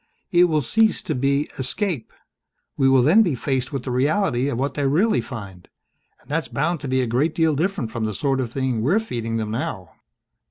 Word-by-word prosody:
It 175 -1 +6
will 155 -4 +1
cease 220 - +2
to - - -2
be 140 +3 +1
escape. 140 - -2 0.6
We 135 -1 +3
will 130 -2 +5
then 170 - +6
be 170 -10 +1
faced 130 +1 -2
with 135 -4 -4
the 125 - -4
reality 135 0 +1
of 125 - -2
what 135 +3 -1
they 145 -2 0
really 190 +11 +2
find 100 -8 -9 0.5
and - - -25
that's 160 +3 -1
bound 160 +4 -1
to 145 - -6
be 130 0 +1
a - - 0
great 130 +7 0
deal 160 -2 +2
different 155 - -1
from 110 -1 -2
the 110 - -2
sort 135 +3 0
of 120 -3 -2
thing 130 -3 -1
we're 155 - +2
feeding 115 - -3
them 110 -1 -3
now." 95 - -4
135 Hz, 210 wpm, -22 LUFS, 120-160 Hz, 0.6 s, It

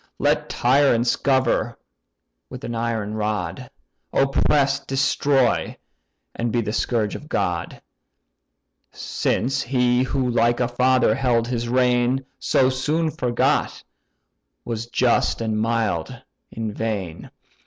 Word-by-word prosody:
Let - - +1
tyrants 125 -2 +3
govern 130 -3 +1 0.7
with 130 +1 -9
an 120 - -4
iron 115 -2 -2
rod, 105 -3 -3 0.4
Oppress, 140 0 +2
destroy, 135 -1 +1 0.6
and 115 0 -2
be 120 - +1
the 105 -1 -3
scourge 115 -3 0
of - - -9
God; - - -2 1.1
Since 135 +4 -1
he 125 -1 +1
who 130 0 -1
like 120 0 +2
a 125 - +1
father 125 -1 +2
held 120 -2 +1
his 120 -1 -3
reign, 125 +1 +2
So 130 - +2
soon 155 +5 0
forgot, 120 -4 0 0.8
was 115 -1 -4
just 120 0 +1
and 110 -2 -1
mild 110 -7 -1 0.3
in 110 -2 -5
vain! 100 -7 -4
120 Hz, 110 wpm, -22 LUFS, 115-130 Hz, 1.1 s, tyrants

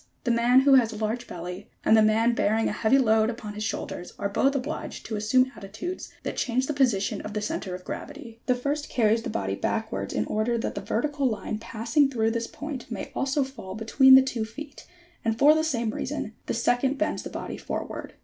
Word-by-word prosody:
The 240 - +1
man 240 +2 +5
who 275 0 +5
has 245 -4 +5
a - - -7
large 225 +3 -2
belly 180 +3 -7 0.2
and 220 - +6
the 220 - +6
man 220 +2 +3
bearing 225 0 +1
a - - 0
heavy 220 +5 +3
load 220 -4 +3
upon 225 -3 -6
his 210 +1 -5
shoulders 180 -3 -4
are 200 - -2
both 275 +7 +2
obliged 265 -1 -4
to 220 - -4
assume 255 +5 +2
attitudes 225 - -6
that - - -3
change 255 0 +1
the 300 - -2
position 215 -7 +1
of 210 - -7
the - - +1
centre 190 -3 -3
of 180 - -10
gravity. 275 -6 -8
The 250 - +3
first 290 +4 -2
carries 225 -1 +2
the - - -5
body 95 -1 -2
back - - -2
wards 100 0 -4
in 105 - +1
order 220 +2 0
that 225 - -2
the - - -4
vertical 285 +3 0
line 215 -1 -4
passing 230 +5 +1
through 225 -4 +1
this 230 0 -2
point 295 -5 -7
may - - -5
also 275 +1 +1
fall 220 -8 -8
between 260 +5 +6
the 265 - +8
two 250 -4 -2
feet, 285 +7 -9 0.4
and 225 -1 0
for 290 +4 +7
the 315 0 +1
same 235 -8 0
reason, 250 -3 -4
the - - -1
second 245 +4 +1
bends - - -1
the - - -7
body - - -5
forward. - - -5
230 Hz, 220 wpm, -26 LUFS, 215-265 Hz, 0.4 s, the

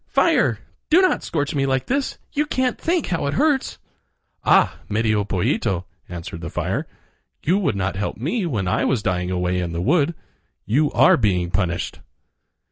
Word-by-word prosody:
fire! - - +3 0.3
do 330 - +6
not 370 -1 +3
scorch 145 -3 -2
me 135 -2 0
like 130 -1 0
this; 275 +2 -1 0.2
you 300 +1 0
can't 255 -3 0
think 340 0 +1
how 165 -5 -1
it 140 - -1
hurts." 290 -2 +1 0.7
"Ah! - - +4
Medio 110 -1 +1
Pollito," 95 -1 -1 0.2
answered 85 -1 -7
the 80 - -5
fire, - - -2 0.6
"you 180 +7 +2
would 175 - 0
not 95 -1 -1
help 105 - -3
me 175 - -1
when 105 - -2
I - - +1
was 120 -6 +1
dying 90 -3 -1
away 90 0 0
in 85 -2 -3
the 85 - -3
wood. 150 - +2 0.5
You 145 +9 +2
are - - +6
being 90 -6 +1
punished." 90 -2 -2
110 Hz, 170 wpm, -22 LUFS, -, 0.7 s, do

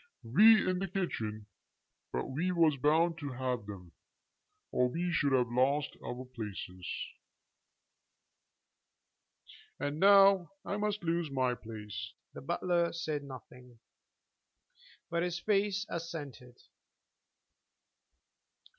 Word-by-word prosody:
"We 210 - +6
in 185 0 +1
the 195 - -2
kitchen. 110 - -3 0.7
But - - -2
we 160 +8 -1
was 165 -4 +4
bound 160 +5 +2
to 145 -3 -5
have 125 -4 -3
them, 90 -4 -9 0.8
or 125 0 +2
we 175 +6 -2
should 145 -4 +1
have 125 -3 +2
lost 140 +4 +1
our 125 +1 -5
places." 105 -7 -7 2.9
"And 145 +2 -2
now 195 -1 +6
I 200 - -2
must 210 -1 -2
lose 170 -1 0
my 130 -2 +1
place." 105 -3 -7 0.2
The - - -8
butler 170 +3 0
said 155 -3 -3
nothing, 125 -2 -12 1.3
but 170 0 +1
his 175 0 -1
face 205 +2 +1
assented. 145 -7 -7
145 Hz, 105 wpm, -32 LUFS, 125-175 Hz, 2.9 s, We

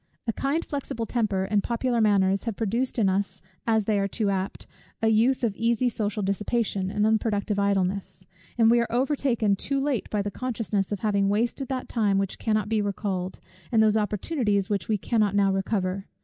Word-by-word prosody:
A 225 - -1
kind 285 +8 -1
flexible 265 -5 -4
temper 210 -5 0
and 200 +1 +1
popular 235 +2 0
manners 200 -2 +3
have 230 -3 -2
produced 235 +5 -1
in 215 -4 +3
us, 190 0 -1 0.3
as 220 -1 +3
they 205 0 +1
are 195 - +1
too 200 0 -1
apt, 190 0 -3 0.3
a 225 - +2
youth 235 +4 +3
of 220 -4 +1
easy 235 +3 +1
social 210 -2 -2
dissipation, 200 0 -1
and 210 +1 +1
unproductive 215 -2 +1
idleness; 190 -1 -1 0.3
and 225 -1 +5
we 240 - +5
are 235 - -1
overtaken 245 -5 +1
too 275 +7 0
late 270 -5 -1
by 210 -1 0
the 205 - -3
consciousness 220 -5 -2
of 205 - -3
having 200 -2 +2
wasted 235 +6 0
that 260 -1 -3
time 210 -4 +1
which 195 -1 -2
cannot 215 -2 0
be 220 -1 +1
recalled, 195 -2 -3 0.3
and 220 -2 +4
those 215 -1 +3
opportunities 210 - 0
which 200 -4 -1
we 215 - +1
cannot 210 -1 +1
now 200 -1 +3
recover. 195 -1 -1
210 Hz, 190 wpm, -26 LUFS, 195-230 Hz, 0.3 s, and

